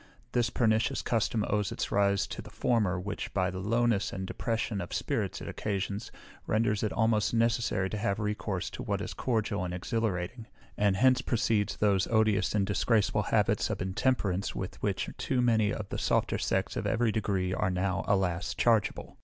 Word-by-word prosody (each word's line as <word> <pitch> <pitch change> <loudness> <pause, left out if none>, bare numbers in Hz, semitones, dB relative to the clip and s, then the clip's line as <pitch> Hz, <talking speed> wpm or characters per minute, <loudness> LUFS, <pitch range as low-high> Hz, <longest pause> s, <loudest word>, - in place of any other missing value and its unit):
This 120 -1 +1
pernicious 110 -1 +1
custom 110 -2 0
owes 105 -1 0
its - - -3
rise 100 -1 +2
to - - -6
the - - -12
former, 105 -7 +1
which, 100 +3 -5
by 95 -1 +1
the 95 - -5
lowness 115 +1 +1
and 95 -1 -4
depression 110 0 -2
of 85 - -6
spirits - - -2
it - - -7
occasions, 100 0 -3 0.4
renders 110 -1 +1
it 110 - 0
almost 110 -1 +2
necessary 115 -4 +1
to 105 - -3
have 100 -1 0
recourse 105 -3 -2
to - - -7
what 105 -5 -1
is 100 - -5
cordial 110 -5 -1
and 90 0 -3
exhilarating; 110 +2 -2 0.3
and 100 -2 +2
hence 130 +4 +4
proceeds 115 -3 +1
those 100 -2 +2
odious 110 -3 +2
and 100 -2 +2
disgraceful 105 0 +2
habits - - +1
of - - -2
intemperance 95 -1 0
with - - -5
which - - -1
too 130 - 0
many 110 -4 +3
of 105 -2 -4
the - - -3
softer - - +1
sex - - -1
of - - -2
every 115 0 +2
degree 95 -3 -1
are 95 - 0
now, 95 +1 -1
alas! 95 -2 0
chargeable. 115 -3 +1
105 Hz, 180 wpm, -30 LUFS, 95-115 Hz, 0.4 s, hence